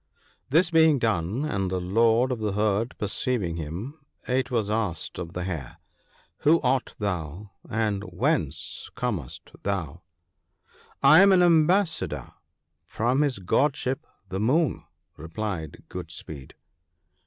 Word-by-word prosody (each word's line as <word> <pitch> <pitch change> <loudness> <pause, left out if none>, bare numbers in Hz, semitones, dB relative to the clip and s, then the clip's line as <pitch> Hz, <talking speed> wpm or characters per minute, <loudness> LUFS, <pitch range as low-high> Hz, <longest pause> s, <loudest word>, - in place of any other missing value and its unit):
" - - -38
This 165 +4 +3
being 160 -2 +5
done, 110 - 0
and 100 -10 -1
the 90 0 -1
Lord 115 +7 +3
of 125 - -2
the 105 -2 -1
herd 105 +3 0
perceiving 100 -4 -1
him, 90 - -6 0.3
it 125 0 0
was 115 -5 0
asked 105 -8 -2
of 85 -1 -6
the 90 - -3
Hare, 85 -9 -5 0.6
'Who 160 +3 +4
art 130 0 0
thou? 90 -1 -4 0.2
and 105 -2 0
whence 90 - -2
comest 100 - -4
thou? 90 -5 -3 0.3
' - - -47
' - - -27 0.3
I 155 +4 +8
am 200 0 +7
an 180 -2 +6
ambassador 170 +1 +2 0.5
from 125 +5 0
his 145 -4 +1
Godship 135 - 0 0.2
the 95 +1 -4
Moon,' 135 - +1 0.3
replied 80 0 -5
Good - - -7
speed. 70 -4 -9
110 Hz, 135 wpm, -26 LUFS, 90-135 Hz, 0.6 s, I